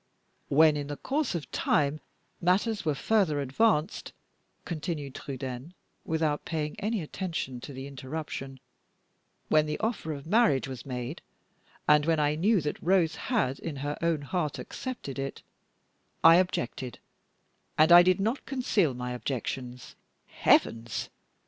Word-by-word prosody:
"When, 155 +1 +5
in 145 -1 -4
the 145 0 -5
course 280 - -1
of 160 - -5
time, 145 +1 +1 0.4
matters 200 +5 +1
were 155 -2 0
further 180 -3 +2
advanced," 150 - +1 0.5
continued 155 -4 -4
Trudaine, 135 +4 -6 0.3
without 155 -2 0
paying 150 -2 -3
any 215 -3 -1
attention 155 -7 -4
to 145 - -8
the 135 0 -7
interruption; 135 -1 -6 0.9
"when 155 0 +4
the 150 - -2
offer 220 -7 -2
of 140 -1 -8
marriage 190 - +3
was 130 -1 -8
made, 125 +4 -5 0.7
and 150 0 +5
when 165 -1 +3
I 150 0 +2
knew 190 +5 +2
that 150 0 -3
Rose 175 -3 +3
had 160 - -1
in 160 -3 -5
her 145 0 -1
own 165 -3 +1
heart 155 0 -2
accepted 240 - -6
it, 135 0 -5 0.8
I 165 +1 +9
objected, 130 -8 -1 0.8
and 155 +2 +5
I 175 0 +11
did 185 +1 +3
not 225 +7 -1
conceal 210 - +1
my 125 0 -4
objections 125 +1 -5 0.2
" - - -46 0.2
"Heavens!" 115 -2 +3
150 Hz, 140 wpm, -28 LUFS, 135-180 Hz, 0.9 s, I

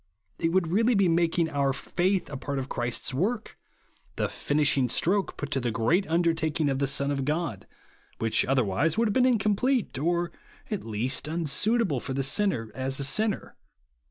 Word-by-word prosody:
It 165 - +1
would 180 -2 +1
really 225 +5 +3
be 195 -2 +3
making 170 0 +2
our 140 -2 +1
faith 180 +7 -1
a - - -5
part 140 +1 -4
of 135 -1 -3
Christ's 120 0 -2
work, 215 - -2 0.3
— - - -37
the - - 0
finishing 145 -3 +1
stroke 190 - +1
put 145 - -5
to 135 - +1
the 120 -2 -1
great 115 - +1
undertaking 160 -2 +1
of 135 -1 -1
the 140 - +1
Son 140 +1 +1
of 135 -1 -1
God, 150 - -2 0.5
which, 115 -1 +1
otherwise, 130 - +1
would 230 0 +3
have - - -1
been 255 +2 +3
incom 210 0 +1
plete, 245 - 0
or, 175 +1 0 0.4
at 210 - -2
least, 115 +6 -2
unsuitable 170 - +1
for 130 - -4
the 135 - 0
sinner, 135 - +1
as 135 +1 -2
a - - +1
sinner. 210 +10 0
155 Hz, 185 wpm, -27 LUFS, 135-190 Hz, 0.5 s, really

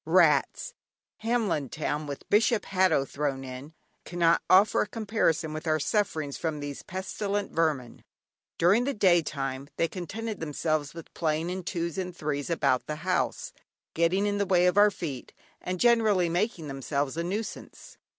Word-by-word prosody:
Rats! - - +3 0.4
Hamlin 215 - 0
Town 150 -1 -3
(with 140 -1 -7
Bishop 215 +1 +3
Hatto 185 -7 +2
thrown 140 -2 -3
in) 130 +4 -9 0.3
cannot 170 -1 +2
offer 195 +3 +5
a - - -1
comparison 200 -8 0
with 155 +1 -6
our 155 0 +2
sufferings 155 -5 -1
from 160 -2 -3
these 145 -1 -6
pestilent 200 +2 -3
vermin. 150 -7 -1 0.5
During 200 +8 +4
the 280 - -1
day 180 -4 +4
time 135 -2 -4
they 165 - +2
contented 210 +5 -5
themselves 155 -1 -2
with 165 - -10
playing 160 +1 -1
in 185 +1 -3
twos 170 0 -3
and 180 -1 -5
threes 145 -1 -3
about 130 -6 +1
the 150 - -3
house, 185 0 -1 0.4
getting 170 +5 +2
in 205 0 0
the 200 - 0
way 180 -1 +4
of 180 - +3
our 205 +1 +7
feet, 150 -10 -6 0.3
and 180 0 -4
generally 215 -7 +4
making 175 -2 -1
themselves 140 +1 -2
a 170 - -2
nuisance. 205 +5 -6
170 Hz, 160 wpm, -28 LUFS, 150-200 Hz, 0.5 s, our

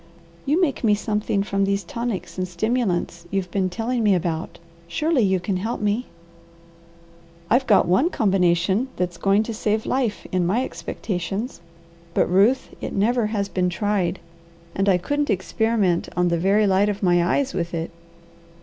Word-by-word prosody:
You 300 +5 +3
make 310 -9 0
me 210 -2 +4
something 210 -1 -1
from 200 -1 0
these 200 0 0
tonics 230 0 -4
and 185 - -1
stimulants 180 -3 -1
you've 195 -1 -2
been 190 -2 0
telling 230 +5 -2
me 205 -3 +4
about. 165 -2 -3 0.3
Surely 300 - +1
you 190 -3 +2
can 185 +1 -2
help 220 +6 -3
me!" 210 +4 -1 1.4
"I've 255 +3 +3
got 210 - +5
one 250 - +3
combination 190 - +2
that's 180 -2 -2
going 200 +3 +3
to 230 - -5
save 215 0 -1
life, 250 -5 -1
in 185 -1 +1
my 205 +9 +1
expectations. 195 +5 -4 0.5
But - - +4
Ruth, 205 +9 +3
it - - -4
never 225 +3 +2
has 205 -2 -1
been 180 -2 0
tried, 185 -1 0 0.6
and 195 +1 +1
I 185 - +5
couldn't 290 +11 -1
experiment 195 -1 +1
on 180 0 +3
the 170 -1 0
very 200 +4 +3
light 195 +1 +3
of 205 0 -4
my 175 -1 +4
eyes 270 +10 0
with 170 -2 -2
it. 165 0 -3
200 Hz, 165 wpm, -23 LUFS, 180-225 Hz, 1.4 s, got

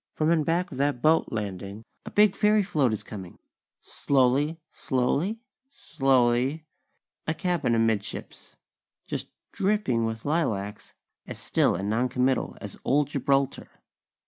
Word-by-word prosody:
_ - - -39
From 155 +1 +2
in 165 -2 +3
back 170 +4 0
of 135 - -7
that 140 -2 +1
boat 160 +1 +4
landing, 100 0 -5 0.2
a - - -3
big 210 -2 +4
fairy 210 0 +3
float 145 - +1
is 110 - -3
coming! 95 -4 -9 0.4
Slowly, 140 +4 +1
slowly 150 - -1 0.3
slowly; 135 - +1 0.6
a 160 - 0
cabin 175 -9 0
amidships, 115 -2 -2 0.5
just - - -4 0.2
dripping 190 - +1
with 115 0 -4
lilacs, 110 -10 -2 0.3
as - - -6
still - - +2
and 95 +3 -3
noncommittal 125 +4 0
as - - -8
old 145 +1 +2
Gibraltar. 140 -1 0
135 Hz, 130 wpm, -26 LUFS, 115-160 Hz, 0.6 s, boat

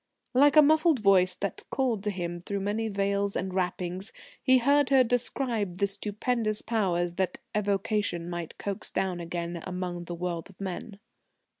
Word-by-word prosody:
Like 285 +4 +5
a 305 - +9
muffled 315 +1 +4
voice 190 -4 +4
that 200 +1 -4
called 245 -7 0
to - - +1
him 175 -3 -4
through 200 +3 -4
many 210 +3 -1
veils 200 -1 0
and 185 0 -2
wrappings, 180 +1 -2 0.3
he 260 -1 +5
heard 280 +3 +3
her 265 -2 +6
describe 235 -5 -1
the 200 - +2
stupendous 210 +2 -1
Powers 180 -6 0
that 190 -1 0 0.2
evocation 200 -3 0
might 175 -2 -5
coax 200 -1 -4
down 185 -2 -1
again 170 0 -4
among 180 -1 -4
the 175 - -5
world 170 0 -4
of 195 - -18
men. 195 +2 -6
200 Hz, 160 wpm, -28 LUFS, 180-225 Hz, 0.3 s, a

